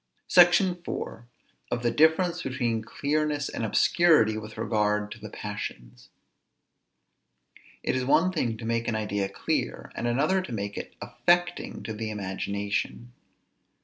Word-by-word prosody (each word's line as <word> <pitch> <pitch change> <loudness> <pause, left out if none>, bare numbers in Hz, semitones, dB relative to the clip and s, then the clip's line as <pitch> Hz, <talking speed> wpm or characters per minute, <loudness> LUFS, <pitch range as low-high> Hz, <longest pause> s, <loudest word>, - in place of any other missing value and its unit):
SECTION 175 +1 +6
IV. 170 -8 -6 0.4
OF 120 0 -2
THE 120 - +2
DIFFERENCE 165 +5 +3
BETWEEN 120 -5 -1
CLEARNESS 145 +4 -1
AND - - -4
OBSCURITY 115 - +4
WITH 110 0 -7
REGARD 105 -2 0
TO 120 - -8
THE 105 0 -8
PASSIONS. 65 -15 -7 1.7
It - - 0
is 130 - 0
one 155 +8 +3
thing 120 -10 -1
to 115 - -8
make 115 0 -1
an 115 - 0
idea 105 -2 -1
clear, - - -2
and 120 - -3
another 150 +11 +2
to 185 - -8
make 100 -2 -3
it - - -7
affecting 175 0 0
to 110 - -4
the 110 +1 -4
imagination. 100 +3 -3
115 Hz, 140 wpm, -27 LUFS, 105-155 Hz, 1.7 s, SECTION